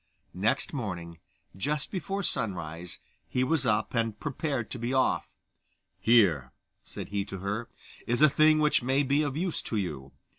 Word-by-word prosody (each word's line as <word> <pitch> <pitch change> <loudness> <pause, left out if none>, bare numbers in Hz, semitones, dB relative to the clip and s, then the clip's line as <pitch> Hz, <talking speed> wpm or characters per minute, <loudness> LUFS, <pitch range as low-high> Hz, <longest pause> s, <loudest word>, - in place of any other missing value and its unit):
Next 100 +4 0
morning, 85 - -4 0.4
just 145 +9 -2
before 195 +1 -2
sunrise, 90 - -3 0.3
he 125 - +1
was 135 -1 +1
up, 105 -1 +1
and 115 -3 0
prepared 140 -4 -2
to 125 - -5
be 120 +3 -1
off, 130 -1 +2 0.7
'Here,' 95 - +4 0.3
said - - -8
he 100 -1 -1
to 100 -1 -6
her, 105 +5 -3 0.4
'is 120 +5 +2
a - - +10
thing 155 +2 +5
which 150 -2 +3
may 135 +3 +2
be 140 +2 +2
of 145 -2 -1
use 175 0 -1
to 110 - -3
you. 70 -9 -3
120 Hz, 160 wpm, -29 LUFS, 100-145 Hz, 0.7 s, a